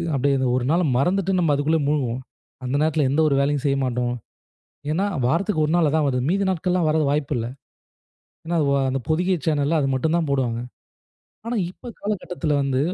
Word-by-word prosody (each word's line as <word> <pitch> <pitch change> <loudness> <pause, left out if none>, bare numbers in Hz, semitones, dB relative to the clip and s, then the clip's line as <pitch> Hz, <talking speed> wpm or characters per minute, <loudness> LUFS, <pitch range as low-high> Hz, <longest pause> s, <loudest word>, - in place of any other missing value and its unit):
அப்படி 130 -1 +1 0.3
மறந்துட்டு 185 +6 +1
நம்ம 165 -4 +2
அதுக்குள்ள 155 +3 +1
முழ்குவோம். 130 -4 -1 0.4
அந்த 125 +2 -1
நேரத்தில 155 -2 +2
எந்த 155 - +2
ஒரு 140 - +2
வேலையும் 145 0 0
செய்ய 140 -1 +2
மாட்டோம். 125 -1 -1 0.8
ஏன்னா 180 +6 +1 0.2
வாரத்துக்கு 165 - +1
1 150 - -1
நாள் 170 -3 +3
அதான் 155 0 +1
வருது. 125 -2 0
மீதி 200 +3 +1
நாட்கள்லாம் 180 -1 0
வரதுக்கு 155 -2 +2
வாய்ப்பு 150 -1 -1
இல்ல. 115 - -2 1.0
ஏன்னா 170 +1 -1
வோ - - +2 0.2
அந்த 135 +1 -1
பொதிகை 180 +4 +1
சேனல்ல 155 0 +1
அத 135 - 0
மட்டும் 160 +5 +1
தான் 165 -3 -1
போடுவாங்க. 125 -4 0 0.9
ஆனா, 235 +1 -2
இப்ப 245 - -12
காலகட்டத்தில 180 -6 -3
வந்து 135 -1 0
150 Hz, 165 wpm, -23 LUFS, 135-170 Hz, 1.0 s, நாள்